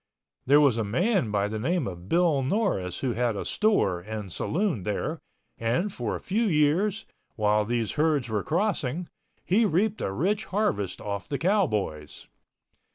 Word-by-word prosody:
There 145 +2 +7
was 140 -6 +4
a 115 - 0
man 175 - +1
by 100 -1 +1
the 110 +1 -4
name 165 +5 0
of 90 -1 -7
Bill 170 -5 +3
Norris 130 - -1
who 130 - 0
had 120 -2 0
a - - -4
store 200 - +2
and 105 -1 -6
saloon 180 - -1
there, 105 - -2 0.4
and 165 - 0
for 120 -4 -3
a - - -5
few 220 +5 0
years, 180 +7 +2 0.3
while 105 0 +2
these 115 -1 -1
herds 150 -5 +1
were 110 -3 -1
crossing, 170 - -1 0.4
he 205 +6 +3
reaped 205 +2 +1
a - - -1
rich 200 - 0
harvest 105 - -1
off 100 -1 -4
the 140 - -2
cowboys. 110 - -1
140 Hz, 160 wpm, -27 LUFS, -, 0.4 s, There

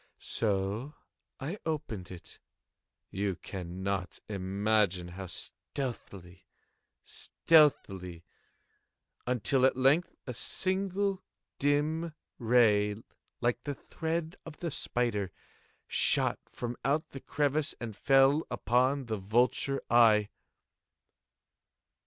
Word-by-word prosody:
So 105 +6 -1 0.4
I 160 +10 -4
opened 145 - -3
it—you 95 +2 -8
cannot 95 +1 -4
imagine 100 -2 0
how 95 +2 -7
stealthily, 95 -6 -6 0.6
stealthily—until, 125 - 0
at 130 - +4
length 140 +7 +3
a 125 - -4
simple 190 - -1 0.4
dim 155 +3 +1 0.2
ray, 110 -4 +4 0.5
like 120 0 0
the 145 -1 -3
thread 160 +4 -3
of 160 -2 -10
the 170 -2 -3
spider, 110 -8 -1 0.6
shot - - +2
from 120 0 -5
out 150 +5 0
the 135 - -8
crevice 145 +1 0
and 115 -3 -5
fell 135 +3 +5
full - - -7
upon 130 +3 +1
the 110 -2 -2
vulture 120 +7 +1
eye. 110 -3 +5
120 Hz, 90 wpm, -31 LUFS, 100-145 Hz, 0.6 s, fell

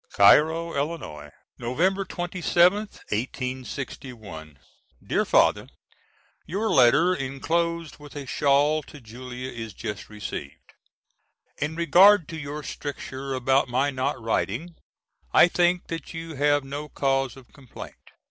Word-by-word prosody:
] - - -25
Cairo, 160 +11 +5
Illinois, 140 - -4 0.3
November 180 +12 0
27th, 180 +2 +1 0.2
1861. 120 - -5 0.5
DEAR - - +1
FATHER: - - +3 0.8
Your 205 +6 -1
letter 135 +8 +5
enclosed 165 +3 -2
with 145 0 -13
a 145 -1 -6
shawl 145 +3 +2
to 150 +1 -13
Julia 125 +2 -8
is 115 -4 -7
just 105 -4 -6
received. 90 -8 -8 0.9
In 150 +2 -2
regard 175 +2 +6
to 165 - -6
your 150 +1 -6
stricture 135 -2 -5
about 130 +1 +2
my 135 +4 +1
not 130 -2 -2
writing 115 - -2 0.6
I - - +8
think 175 0 +1
that 165 -1 -6
you 165 0 -6
have 145 0 +2
no 145 +2 -6
cause 135 -2 0
of 130 -3 -16
complaint. 135 -5 -11
140 Hz, 120 wpm, -25 LUFS, 125-165 Hz, 0.9 s, I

